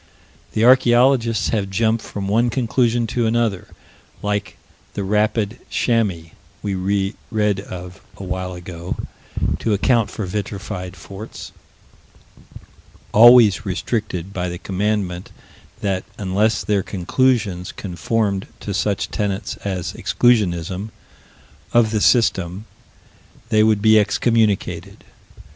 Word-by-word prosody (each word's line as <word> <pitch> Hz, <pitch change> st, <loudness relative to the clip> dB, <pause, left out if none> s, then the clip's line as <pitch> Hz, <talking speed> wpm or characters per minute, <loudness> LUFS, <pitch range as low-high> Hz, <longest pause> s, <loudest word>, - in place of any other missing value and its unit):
The 110 Hz, -, +2 dB
archaeologists 120 Hz, -2 st, +4 dB
have 100 Hz, -4 st, -1 dB
jumped 110 Hz, +3 st, +1 dB
from 100 Hz, -1 st, -5 dB
one 115 Hz, +4 st, +2 dB
conclusion 120 Hz, 0 st, +1 dB
to 115 Hz, +1 st, 0 dB
another, 115 Hz, -4 st, 0 dB, 0.6 s
like 105 Hz, 0 st, -2 dB, 0.4 s
the 100 Hz, -, -2 dB
"rapid 105 Hz, +2 st, 0 dB
chamois" 100 Hz, -9 st, 0 dB, 0.3 s
we 100 Hz, -2 st, -1 dB, 0.6 s
read 105 Hz, -3 st, +1 dB
of 90 Hz, -1 st, -9 dB, 0.2 s
a -, -, -8 dB
while 90 Hz, 0 st, -4 dB
ago, 85 Hz, 0 st, -6 dB, 0.6 s
to 110 Hz, -, 0 dB
account 115 Hz, 0 st, +2 dB
for 105 Hz, -, -5 dB
vitrified 95 Hz, -1 st, -5 dB
forts, 100 Hz, +3 st, -9 dB, 1.6 s
always 115 Hz, -2 st, +7 dB
restricted 100 Hz, -2 st, -3 dB
by 90 Hz, -1 st, -2 dB
the 90 Hz, -, -5 dB
commandment 95 Hz, -1 st, -2 dB, 0.5 s
that 95 Hz, -2 st, -1 dB
unless 105 Hz, +3 st, +1 dB
their 105 Hz, -2 st, +1 dB
conclusions 100 Hz, 0 st, 0 dB
conformed 100 Hz, +1 st, -2 dB
to 100 Hz, -, -4 dB
such 100 Hz, 0 st, -1 dB
tenets 100 Hz, -3 st, -2 dB
as 95 Hz, -3 st, -4 dB
Exclusionism, 95 Hz, -4 st, +1 dB, 0.8 s
of 115 Hz, -2 st, +4 dB
the 110 Hz, -2 st, 0 dB
System, 95 Hz, -5 st, +2 dB, 0.8 s
they 110 Hz, -, +4 dB
would 110 Hz, -1 st, +3 dB
be 110 Hz, 0 st, +6 dB
excommunicated. 105 Hz, -5 st, 0 dB
105 Hz, 110 wpm, -20 LUFS, 95-115 Hz, 1.6 s, always